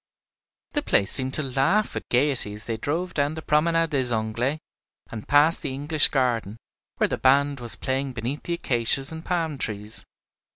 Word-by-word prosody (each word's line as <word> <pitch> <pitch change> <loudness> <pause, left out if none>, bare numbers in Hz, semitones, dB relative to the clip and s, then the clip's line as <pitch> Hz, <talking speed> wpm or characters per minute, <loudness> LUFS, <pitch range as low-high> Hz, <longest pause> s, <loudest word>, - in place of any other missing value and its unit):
The 295 - -1
place 100 - +2
seemed 130 -1 +3
to 155 - -2
laugh 140 +11 0
with - - -7
gayety 125 -5 +1
as 105 +2 -9
they 115 - -3
drove 165 +10 -3
down 145 +1 -1
the 160 - -7
Promenade 165 +2 +1
des 130 -4 +2
Anglais 115 +6 -1 0.5
and 110 -2 -8
past 150 +3 +3
the 130 - -4
English 145 +1 +3
garden, 120 -6 -1 0.4
where - - +2
the - - -4
band 140 +1 +2
was 120 -2 -4
playing 135 0 -3
beneath 120 +5 -4
the 170 - -4
acacias 135 -1 +3
and 160 0 -6
palm 165 -6 -2
trees. 105 -1 -3
135 Hz, 175 wpm, -24 LUFS, 120-155 Hz, 0.5 s, seemed